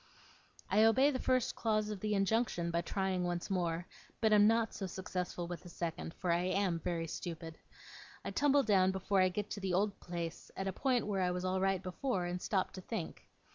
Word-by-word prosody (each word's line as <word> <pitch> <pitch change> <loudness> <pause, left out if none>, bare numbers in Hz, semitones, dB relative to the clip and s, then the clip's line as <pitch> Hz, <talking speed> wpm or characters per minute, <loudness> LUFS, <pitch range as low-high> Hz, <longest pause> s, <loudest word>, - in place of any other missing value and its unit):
I 205 +3 +3
obey 260 +6 +5
the 260 - -2
first 255 -1 +1
clause 215 -2 0
of 205 - -5
the 210 +1 0
injunction 195 -4 +1
by 170 0 +1
trying 190 +1 -1
once 175 +2 -2
more, 175 -2 0 0.3
but 220 -2 +3
am 210 0 +7
not 225 0 +2
so 195 - -4
successful 180 -1 -4
with 175 0 -6
the 175 - -11
second, 165 -1 -4
for 180 -3 -1
I 170 +1 +3
am 185 -2 +1
very 165 0 -2
stupid. 165 0 -6 0.7
I - - -2
tumble 285 -1 +4
down 190 -4 +4
before 190 +1 +1
I 185 - +4
get 205 +2 -4
to 205 - -3
the 190 -2 -1
old 200 +1 +1
place, 170 -2 -5
at 195 - -2
a 190 - -1
point 255 0 +1
where 200 -2 0
I 180 - +2
was 180 +1 -2
all 185 0 0
right 195 -1 +1
before, 185 +1 -1
and 175 +1 -3
stop 190 -3 0
to 185 - -8
think. 195 -3 -5
190 Hz, 215 wpm, -34 LUFS, 175-210 Hz, 0.7 s, am